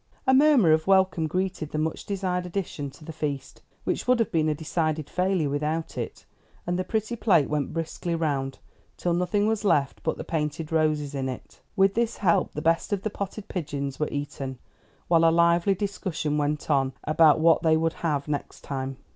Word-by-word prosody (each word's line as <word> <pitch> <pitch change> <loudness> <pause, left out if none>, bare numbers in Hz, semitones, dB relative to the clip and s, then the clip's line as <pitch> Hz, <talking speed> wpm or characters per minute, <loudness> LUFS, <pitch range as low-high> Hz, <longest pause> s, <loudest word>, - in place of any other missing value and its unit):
A 260 - +4
murmur 265 - +6
of 155 +2 +2
welcome 190 -4 +3
greeted 180 -2 -2
the 155 - -4
much 155 +1 -2
desired 185 -3 -2
addition 170 -6 -4
to 150 +3 -15
the 160 - -7
feast, 145 -3 -4 0.2
which - - -2
would 250 0 +5
have 230 - 0
been 155 -2 +2
a 150 - 0
decided 155 -1 -1
failure 180 -4 0
without 150 +3 -2
it, - - -5 0.4
and 175 +1 -1
the - - 0
pretty 220 +3 -2
plate 175 -10 +3
went 150 -2 -1
briskly 165 +1 -3
round, 140 -5 -1 0.4
till 175 - 0
nothing 180 +4 +1
was 220 -1 0
left 150 -8 +1
but 160 - -1
the - - -5
painted 155 0 -3
roses 155 -2 +1
in 135 -1 -2
it. 130 - -9
With 195 -1 +4
this 235 +1 0
help 180 -5 +2
the 150 - -5
best 165 +4 +1
of 200 -2 -1
the 215 - -2
potted 200 +1 -5
pigeons 140 -6 -4
were 150 - 0
eaten, 140 -2 -4 0.5
while 165 -1 +4
a 165 - +7
lively 170 +3 +3
discussion 185 -6 -2
went 150 +1 -1
on 135 -2 +2
about 155 0 +5
what 165 0 +5
they 160 -1 +4
would 165 0 0
have 150 -4 -1
next 145 -1 -4
time. 135 -1 -4
160 Hz, 195 wpm, -26 LUFS, 150-185 Hz, 0.5 s, a